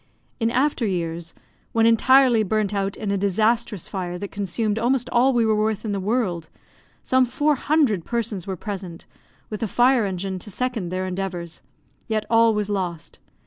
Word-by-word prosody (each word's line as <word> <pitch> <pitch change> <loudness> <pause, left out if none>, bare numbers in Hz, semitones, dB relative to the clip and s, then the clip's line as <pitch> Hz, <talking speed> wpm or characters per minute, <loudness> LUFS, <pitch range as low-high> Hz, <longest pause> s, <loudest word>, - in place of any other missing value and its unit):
In 225 -1 +1
after 260 +2 +1
years, 170 -4 -3 0.4
when 225 0 +3
entirely 245 +1 +5
burnt 215 0 0
out 195 -1 -2
in 210 -2 -3
a 200 - 0
disastrous 215 +1 0
fire 180 -2 -4
that 200 +2 -6
consumed 205 +2 -1
almost 245 +1 +1
all 250 +2 +4
we 240 -3 +2
were 220 -1 +2
worth 215 0 -1
in 215 - -2
the 200 - -1
world, 190 -6 -1 0.5
some 260 0 +3
four 290 +5 +1
hundred 275 - +1
persons 225 -5 -3
were 190 -1 -3
present, 190 -4 -7 0.5
with 215 - -5
a 225 - 0
fire 245 +1 +3
engine 190 0 -4
to 210 - -8
second 230 -3 -3
their 185 +1 -2
endeavours, 180 -3 -5 0.5
yet 215 -2 -1
all 230 -1 +5
was 210 -1 -1
lost. 180 -5 -4
210 Hz, 175 wpm, -23 LUFS, 190-235 Hz, 0.5 s, entirely